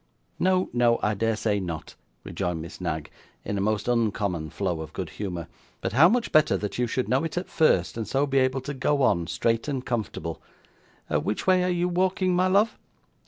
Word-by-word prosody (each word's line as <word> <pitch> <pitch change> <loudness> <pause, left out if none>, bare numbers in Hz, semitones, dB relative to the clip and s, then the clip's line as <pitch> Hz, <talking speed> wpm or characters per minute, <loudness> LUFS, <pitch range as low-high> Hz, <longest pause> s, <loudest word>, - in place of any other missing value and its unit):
'No, 185 0 +2
no, 120 -1 +3
I 105 - +2
dare 115 +2 0
say 105 -1 0
not,' 85 -4 -5 0.3
rejoined 90 -2 -3
Miss 80 +1 -9
Knag, 75 -1 -3 0.3
in 100 - -2
a 100 - -1
most 105 +1 0
uncommon 105 -9 0
flow 90 -1 -2
of 80 - -8
good 90 -5 -5
humour. 90 -2 -5 0.3
'But - - -3
how 155 +8 +7
much 240 +2 0
better 155 -1 +4
that 105 +3 -4
you 125 - +2
should 125 +2 -1
know 130 +3 +2
it 165 +1 -4
at 180 - -2
first, 95 - +2
and 110 -3 -3
so 135 +6 +1
be 135 -1 +2
able 130 0 +1
to 145 - -5
go 140 +1 +1
on, 85 -8 +2
straight 115 - 0
and 135 -3 -3
comfortable! 100 -8 -3 0.7
Which 105 - -1
way 185 -1 +4
are 180 - +1
you 175 0 +1
walking, 185 +1 +1
my 185 +1 +3
love? 200 +4 +2
115 Hz, 205 wpm, -26 LUFS, 95-155 Hz, 0.7 s, how